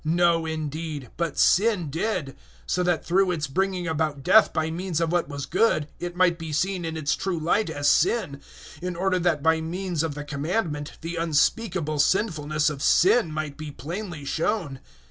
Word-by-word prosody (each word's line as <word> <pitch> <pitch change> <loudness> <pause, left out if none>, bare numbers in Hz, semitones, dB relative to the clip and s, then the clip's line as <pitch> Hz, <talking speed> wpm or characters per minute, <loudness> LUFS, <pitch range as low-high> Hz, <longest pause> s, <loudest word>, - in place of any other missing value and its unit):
No, 165 0 +2
indeed, 155 -4 -4
but 170 -1 -2
sin 190 -6 +3
did; 165 - -2 0.3
so 180 - 0
that 175 -2 0
through 190 +2 +3
its 160 -4 -1
bringing 185 +4 -1
about 155 -3 -1
death 220 - +6
by 160 0 -1
means 175 -1 -2
of 165 -1 0
what 175 -2 0
was 145 -1 -5
good, 175 -6 +2
it 175 0 -5
might 180 -2 +3
be 160 -1 -6
seen 180 +3 -1
in 160 0 -4
its 150 -2 0
true 190 -3 -2
light 170 +5 +1
as 145 -2 -1
sin, 160 -6 +2 0.4
in 180 0 -3
order 185 +1 +1
that 165 -4 +1
by 160 0 +3
means 175 0 -2
of 160 -3 -2
the 145 - -5
Commandment 150 0 -2
the 170 +1 -5
unspeakable 165 0 0
sinfulness 155 -4 +1
of 145 -3 -2
sin 190 +2 +4
might 155 -2 -4
be 155 -1 -6
plainly 170 +1 -6
shown. 160 -3 -1
165 Hz, 180 wpm, -25 LUFS, 150-180 Hz, 0.4 s, death